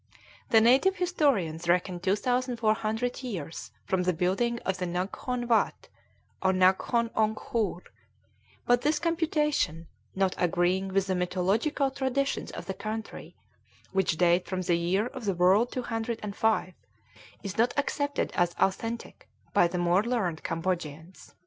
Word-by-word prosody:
The 225 - +6
native 265 +12 +5
historians 270 - 0
reckon 180 +1 +1
2,400 225 +3 0
years 185 - -6 0.2
from 190 -1 0
the 180 0 +1
building 195 +8 0
of 190 -1 -1
the 180 - -2
Naghkon 200 +8 -3
Watt, 230 -2 +1 0.5
or 190 - +3
Naghkon 190 +5 +2
Ongkhoor; 215 -3 -1 0.8
but 245 0 +3
this 300 +1 +2
computation, 300 - 0 0.3
not 190 -1 +1
agreeing 180 +2 +1
with 195 0 +1
the 190 - -1
mythological 195 - 0
traditions 270 +1 -1
of - - -7
the 190 - -3
country, 215 +3 -6 0.6
which 190 -4 +1
date 175 +1 +3
from 185 -1 -2
the 175 - +1
Year 180 +5 +1
of 250 -1 -7
the 195 -2 0
World 190 +7 +4
205, 225 -4 -1 0.7
is 200 +1 -5
not 235 +2 +4
accepted 285 0 -1
as 175 -1 +1
authentic 225 +4 -2 0.2
by 175 - +5
the 180 - -4
more 175 +2 +3
learned 210 -9 -1
Cambodians. 165 -1 -4
200 Hz, 130 wpm, -28 LUFS, 180-240 Hz, 0.8 s, The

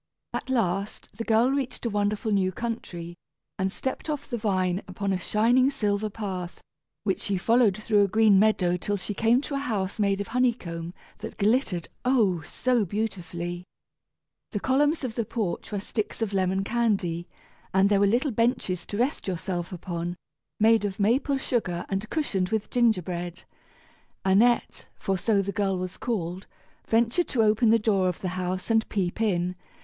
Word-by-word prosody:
At - - -4
last 200 -5 -1
the 230 - -4
girl 230 +3 +3
reached 265 -3 -2
a - - +1
wonderful 205 +1 0
new 190 -2 +2
country, 180 -6 -5 0.5
and 190 0 0
stepped 265 +8 -4
off 290 -2 -3
the 245 - -3
vine 190 -4 0
upon 195 +1 -2
a 185 - -1
shining 235 +7 +3
silver 210 -6 -1
path, 190 -4 -5 0.4
which 195 -3 0
she 200 -2 -1
followed 225 0 +3
through 215 -1 +2
a - - +3
green 215 -1 +5
meadow 185 -4 +3
till 205 +3 -2
she 200 +2 -4
came 230 +5 +3
to 290 - -6
a 275 - 0
house 210 -8 -2
made 200 -1 +2
of 200 - -4
honey 250 0 +3
comb 170 -4 -7 0.2
that - - -7
glittered, 205 - +1 0.2
oh! 220 -10 +3
so 240 - 0
beautifully. 175 -4 -4 0.9
The 205 - -3
columns 290 +6 +2
of 250 -4 -2
the 230 - -1
porch 215 -4 -3
were 205 - -1
sticks 210 +2 -4
of 205 -2 -3
lemon 190 0 +1
candy, 195 -7 0 0.4
and 190 +1 +4
there 200 -1 +3
were 200 - +4
little 250 +7 +2
benches 230 -6 0
to 205 - -4
rest 250 +2 0
yourself 175 0 -3
upon, 175 -1 -4 0.4
made 220 0 +5
of 200 -1 -3
maple 255 +7 +2
sugar 185 -10 -1
and 195 +2 -2
cushioned 195 - 0
with 220 -1 -2
gingerbread. 180 -7 0 0.8
Annette, 225 +6 +3
for 195 - -1
so 200 +1 +2
the 200 - -3
girl 195 -1 0
was 180 0 -5
called, 185 -6 -3 0.4
ventured 235 +9 +2
to 230 -4 +2
open 215 +2 +4
the 230 - +6
door 200 -4 +2
of 180 - -5
the 185 - -2
house 185 +2 -3
and 225 0 +2
peep 190 +1 -1
in. 180 -4 +1
205 Hz, 175 wpm, -26 LUFS, 185-230 Hz, 0.9 s, the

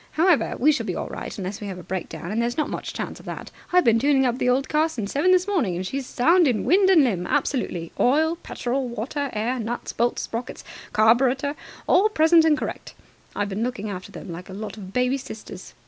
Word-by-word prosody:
However, 335 -1 +3
we 300 +5 +4
shall 305 - -2
be - - -2
all - - -4
right - - -7
unless 195 +1 -5
we 205 - -5
have 190 -2 -6
a 180 - -9
breakdown, 180 0 -5
and 225 +2 0
there's 240 +1 -1
not 305 -1 -1
much - - -4
chance - - -5
of - - -15
that. - - -7 0.2
I've 360 0 +5
been 230 -1 +4
tuning 270 +1 +3
up 245 0 0
the 250 - +2
old 265 +3 +2
car 310 +2 +2
since 220 -10 -5
seven 295 +6 +2
this 370 +1 +4
morning, 290 - 0
and 185 +2 -3
she's 265 +5 -4
sound 335 +6 +4
in 240 -5 +1
wind 380 +2 +4
and 340 -6 +6
limb, 185 -9 0
absolutely. 230 - -1
Oil 315 +6 +3
petrol 260 -4 -3
water 270 +5 -3
air 235 +4 -1
nuts 235 +2 -4
bolts 240 +1 0
sprockets 235 +2 -6 0.3
carburetor 255 +6 +3 0.3
all 395 +4 +4
present 325 -3 +5
and 310 -2 +4
correct. - - -6 0.4
I've 205 0 -1
been 200 +2 -3
looking 215 -4 -3
after 185 -1 -7
them - - -9
like 175 +3 -8
a - - -8
lot 210 +2 -6
of 190 -3 -9
baby 250 +4 +1
sisters. 215 -6 -10
250 Hz, 225 wpm, -24 LUFS, 210-300 Hz, 0.4 s, and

